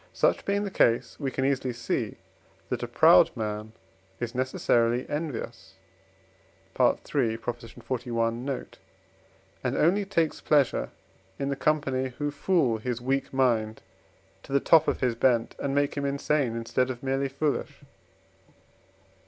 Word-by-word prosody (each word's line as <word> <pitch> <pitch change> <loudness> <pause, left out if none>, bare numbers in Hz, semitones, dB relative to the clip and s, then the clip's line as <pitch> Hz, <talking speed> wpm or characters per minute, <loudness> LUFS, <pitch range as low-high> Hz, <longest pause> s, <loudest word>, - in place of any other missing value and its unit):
Such - - +1
being 200 +1 0
the 185 - +3
ease, - - -16
we 140 -3 -1
can 130 +1 -2
easily 130 -2 0
see 120 +1 -3 0.5
that - - -2
a - - -3
proud - - +6
man 105 0 -4 0.5
is 120 -1 -4
necessarily 125 -1 +1
envious 150 -3 -5 1.0
(III. - - +4 0.4
xli. 115 0 -3
note), 130 +3 -5 0.8
and - - -1
only 190 +6 +3
takes 165 -5 0
pleasure 140 - +2 0.5
in 140 0 -2
the 140 - -1
company, 135 -3 0
who 145 0 -1
fool 145 -7 +1
his 125 +1 -3
weak 135 +2 -1
mind 115 -5 +1 0.6
to - - -13
the 140 - +4
top 160 +2 +5
of - - 0
his 125 -2 +2
bent, 115 -1 +1
and 140 0 -2
make 145 0 +1
him 140 -1 -2
insane 140 -3 0
instead 115 +2 0
of 125 0 -6
merely 135 +1 0
foolish. 140 +2 -2
130 Hz, 135 wpm, -27 LUFS, 120-145 Hz, 1.0 s, proud